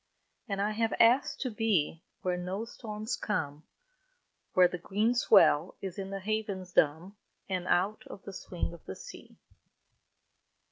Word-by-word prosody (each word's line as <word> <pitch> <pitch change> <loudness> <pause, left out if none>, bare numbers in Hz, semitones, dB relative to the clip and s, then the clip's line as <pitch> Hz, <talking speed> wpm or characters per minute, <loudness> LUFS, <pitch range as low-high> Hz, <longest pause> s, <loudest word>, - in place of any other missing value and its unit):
And 195 -1 -2
I 205 +2 +1
have 225 +1 0
asked 240 +4 +4
to 255 - -1
be 200 -8 +1 0.2
Where 180 -1 +1
no 185 +5 -3
storms 215 -1 -5
come, 155 -8 -2 0.9
Where 185 -1 +7
the 180 0 -6
green 210 +7 +1
swell 235 -10 +5
is 190 -1 -6
in 195 0 -4
the 195 0 -5
havens 200 -3 -3
dumb, 165 +7 +2 0.3
And 185 -2 -2
out 195 +4 +2
of 195 - -10
the 200 - -8
swing 180 -2 -4
of 170 - -13
the - - -5
sea. - - -12
195 Hz, 150 wpm, -30 LUFS, 180-215 Hz, 0.9 s, Where